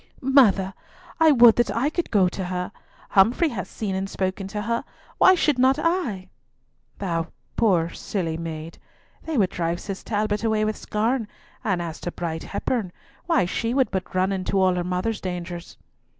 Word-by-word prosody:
"Mother, 225 -8 +4 0.5
I 320 -1 +6
would 240 -4 +7
that 240 - +2
I 275 +6 +1
could 345 +1 -2
go 195 -4 +4
to 185 +1 -4
her; 180 +1 -3 0.4
Humfrey 235 - +4
has 195 -7 -5
seen 205 -3 -4
and 190 +1 -2
spoken 190 +1 -2
to 210 +1 -4
her, 235 +3 -1 0.4
why 375 - +7
should 300 -6 +1
not 260 +2 +4
I?" 305 - -1 0.7
"Thou, 170 -4 -2 0.3
poor 180 -7 +3
silly 170 -6 -3
maid! 165 0 -6 0.4
They 320 -3 -3
would 195 -5 +3
drive 170 0 -2
Cis 195 -2 -6
Talbot 210 0 -1
away 220 -1 +2
with 215 0 -1
scorn, 225 +2 -1 0.4
and 185 -4 0
as 165 -1 -6
to 175 - -3
Bride 160 -2 -4
Hepburn, 205 -2 -2 0.4
why, 330 - +3
she 230 +7 -2
would 265 -2 +2
but 185 0 -4
run 185 +1 +2
into 195 0 -1
all 185 -1 +4
her 180 0 -1
mother's 185 +5 -2
dangers." 175 -1 -6
195 Hz, 175 wpm, -24 LUFS, 180-235 Hz, 0.7 s, would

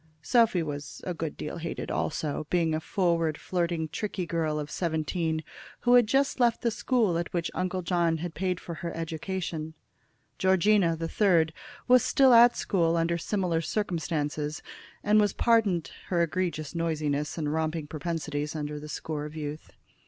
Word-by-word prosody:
Sophy 230 -8 +3
was 145 -2 -6
a 180 - -3
good 160 -2 -4
deal 150 - -5
hated 165 0 -5
also, 155 -1 -2
being 165 -3 +2
a 155 - 0
forward, 165 -3 0
flirting, 170 -3 -1
tricky 185 +3 -3
girl 160 -2 -1
of 150 0 -5
seventeen, 160 -1 -1 0.4
who 245 - +4
had 245 -3 +6
just 270 +3 +1
left 235 -2 +3
the 235 - +2
school 220 -7 +1
at 170 - -4
which 170 -2 -2
Uncle 185 0 -2
John 170 -2 +1
had 170 +1 -5
paid 185 -1 -1
for 170 - -7
her 170 - -3
education. 165 -1 -4 0.6
Georgina, 190 -2 +4
the 165 0 -3
third, 165 -5 +3 0.3
was 250 -1 +6
still 265 -2 +5
at 235 +1 +7
school 170 -3 +1
under 170 +1 +1
similar 180 -3 0
circumstances, 155 -5 -2 0.4
and 210 +1 +5
was 205 - +2
pardoned 210 -8 +2 0.2
her 170 -2 +2
egregious 165 -3 -2
noisiness 155 -3 -1
and 150 -2 -1
romping 160 0 -1
propensities 150 -1 -3
under 150 -1 -4
the 150 +1 -9
score 150 0 -4
of 150 +1 -8
youth. 150 0 -6
165 Hz, 160 wpm, -28 LUFS, 155-185 Hz, 0.6 s, at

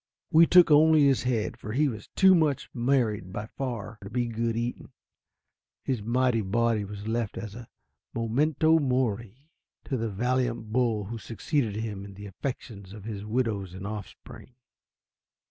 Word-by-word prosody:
We 165 +1 +7
took 180 -3 +7
only 155 0 +6
his 135 -2 +3
head, 120 -4 -1
for 105 - -7
he 145 +4 +3
was 110 -6 -6
too 190 -1 +7
much 155 -6 +1
married 115 -7 0
by 105 +3 -4
far 115 -4 -5
to 100 - -8
be 120 +2 -1
good 115 0 -2
eating. 120 +1 -4 0.9
His 130 -5 -1
mighty 120 +1 +1
body 110 +2 +1
was 100 +1 -7
left 115 -1 -2
as 110 -3 -6
a 120 +1 -10 0.5
memento 150 +8 +2
mori 125 -2 -1 0.4
to 135 - -2
the 115 -1 -2
valiant 120 +1 -1
bull 115 -4 +1
who 115 +3 -6
succeeded 115 0 -2
him 105 -3 -4
in 100 -1 -10
the 105 +1 -9
affections 100 -2 -6
of 105 -2 -10
his 105 -2 -6
widows 105 -5 -2
and 95 +1 -7
offspring. 105 +4 -9
115 Hz, 160 wpm, -27 LUFS, 105-130 Hz, 0.9 s, We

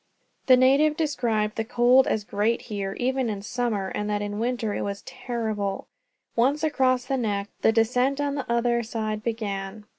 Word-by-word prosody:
The 255 -1 +8
native 280 +4 +4
described 230 -9 0
the 225 - 0
cold 245 +3 +4
as 215 - 0
great 210 +3 0
here, 195 -1 -3
even 260 -1 0
in 200 -2 -4
summer, 220 -4 -2
and 210 0 -3
that 205 0 -1
in 205 0 -4
winter 235 -2 -1
it - - -3
was 200 0 -4
terrible. 215 -5 -3 0.5
Once 275 +6 +2
across 260 -5 +2
the 270 0 -1
neck, 205 -4 -2
the - - +5
descent 250 +5 +2
on 285 -1 0
the 275 -4 -4
other 235 0 +2
side 215 -2 -3
began. 210 -2 -4
230 Hz, 175 wpm, -25 LUFS, 210-255 Hz, 0.5 s, The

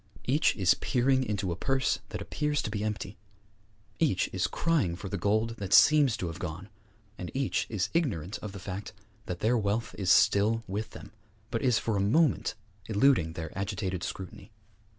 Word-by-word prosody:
Each 145 +6 +2
is 95 -4 +4
peering 130 +1 +1
into 100 -6 -2
a - - -2
purse 135 +7 0
that - - -5
appears 150 0 -1
to 105 - -3
be 105 -1 -2
empty; 105 -3 -4 0.8
each - - +1
is 90 -2 +1
crying 150 - 0
for 95 +2 -7
the 100 - -3
gold 110 +4 0
that 100 -3 -3
seems 145 -6 +6
to - - -3
have 85 0 -5
gone; 90 +3 -6 0.5
and 90 - -5
each 135 -1 0
is 100 -5 -1
ignorant 110 - -1
of 105 - -6
the 100 - -8
fact 95 +1 -6 0.3
that 90 -1 -5
their 115 +2 +3
wealth 110 +3 -1
is 95 -3 +2
still 110 +6 +4
with 105 +4 -4
them, - - -11 0.4
but 115 - -1
is 125 -4 +3
for 110 -3 -1
a - - +1
moment 120 +1 +2 0.3
eluding 105 - +3
their 80 -1 -6
agitated 95 -1 -3
scrutiny. 95 +3 -7
105 Hz, 180 wpm, -29 LUFS, 95-125 Hz, 0.8 s, seems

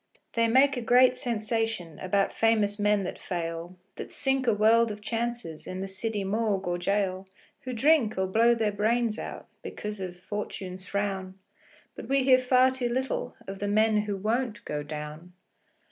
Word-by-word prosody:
They 230 0 +3
make 265 +4 +4
a - - -2
great 250 +2 +5
sensation 225 -8 -2
About 195 +1 0
famous 215 -2 +2
men 205 -1 +2
that 185 - -5
fail, 170 0 -5 0.2
That - - -7
sink 270 -2 0
a 230 - +5
world 225 +2 +4
of 210 -1 -6
chances 230 -6 -4
In 185 - -5
the 195 - -3
city 205 +2 -3
morgue 200 -1 0
or 175 0 -1
gaol, 190 0 -1 0.4
Who 255 - -3
drink, 245 -3 +3
or 190 - +1
blow 230 +5 +4
their 220 -2 0
brains 220 +2 0
out, - - -7
Because 210 -1 -6
of 180 -2 -6
"Fortune's 190 -1 -6
frown". 195 -2 -3 0.6
But - - -9
we 275 0 +3
hear 255 -1 +6
far 255 0 +4
too 255 -2 -2
little 260 +2 -2
Of 195 0 -6
the 205 - -2
men 215 +1 +3
who 210 -1 -1
won't 220 +2 -2
go 150 0 -3
down. 150 +3 -7
210 Hz, 175 wpm, -28 LUFS, 190-235 Hz, 0.6 s, hear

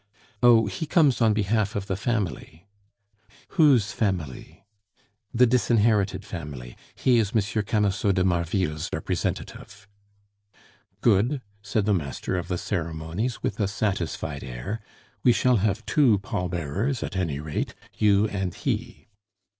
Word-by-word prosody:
"Oh! 115 -2 +6
he 155 - -4
comes 150 -6 +3
on 110 -1 +5
behalf 105 0 0
of 100 -1 -2
the 95 - -2
family." 95 - -3 0.8
"Whose 135 - +4
family?" 95 - -3 0.7
"The 125 +2 +5
disinherited 105 -5 +2
family. 75 -10 -7 0.2
He 125 -2 +3
is 105 -3 0
M. 105 0 +1
Camusot 105 -1 +1
de 90 - +2
Marville's 85 -3 0
representative." 100 +1 -4 1.1
"Good," 120 +5 +2 0.2
said 105 0 -1
the 105 - +3
master 80 0 -2
of 90 - -3
the 90 - -1
ceremonies, 85 +6 -3
with 105 - -2
a 100 - +2
satisfied 95 -8 -2
air. 65 - -5 0.4
"We 120 - +6
shall 125 0 +3
have 105 +2 0
two 130 -9 +4
pall 90 -2 -3
bearers 95 - -2
at - - -5
any 80 -7 -1
rate 75 0 -3 0.2
you 105 0 +3
and 95 -4 -3
he." - - -3
100 Hz, 130 wpm, -25 LUFS, 90-115 Hz, 1.1 s, Oh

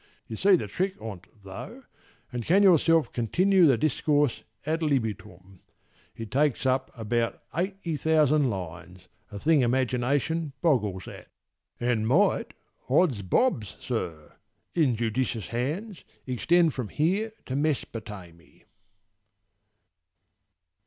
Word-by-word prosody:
You 110 - -7
see 195 - +5
the 160 - -2
trick 185 - -2
on't 100 -4 -8 0.2
though, 100 - -9 0.5
and 120 -1 -3
can 190 - +4
yourself 165 -3 +4
Continue 180 - +3
the 130 -4 +4
discourse 145 0 +1 0.2
ad 160 +2 -1
libitum. 105 - -3 0.6
It 115 -1 -8
takes 140 -1 +1
up 130 0 +1
about 115 +1 -1 0.2
eighty 180 -2 -2
thousand 155 -2 +3
lines, 90 -1 -7 0.2
A 100 - -6
thing 155 +5 +3
imagination 130 +5 0
boggles 105 - 0
at: - - -10 0.5
And 120 -3 0
might, 175 - +2 0.3
odds 140 - +3
bobs, 105 - 0
sir! 85 -11 -5 0.4
in 145 -8 +2
judicious 115 -1 -2
hands, 160 - -3 0.2
Extend 160 +6 +2
from 125 -4 -4
here 195 - 0
to 130 - -4
Mesopotamy. 105 - -4
130 Hz, 110 wpm, -27 LUFS, 110-160 Hz, 0.6 s, see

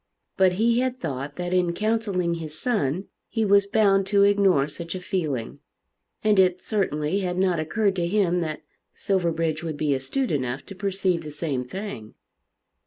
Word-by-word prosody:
But 190 -1 +4
he 230 +5 +2
had 255 0 -1
thought 140 - -4
that 180 0 -3
in 180 -2 +2
counselling 210 -4 0
his 155 -1 -6
son 185 - -1 0.2
he 225 -2 0
was 200 0 +4
bound 195 -2 +3
to 200 0 +4
ignore 195 -8 +4
such 170 +3 -6
a - - -3
feeling; 155 -11 -3 0.6
and 210 -2 +4
it 180 -1 +4
certainly 190 -5 -1
had 180 -2 -2
not 185 -3 +2
occurred 195 +5 0
to 170 -1 0
him 180 -2 +2
that 155 -2 -4 0.3
Silverbridge 165 -4 0
would 160 -3 -4
be 145 -1 +1
astute 135 - -2
enough 130 -2 -2
to 195 - -10
perceive 190 -3 0
the 155 - -7
same 145 -3 -2
thing. 130 - -7
180 Hz, 170 wpm, -25 LUFS, 155-200 Hz, 0.6 s, But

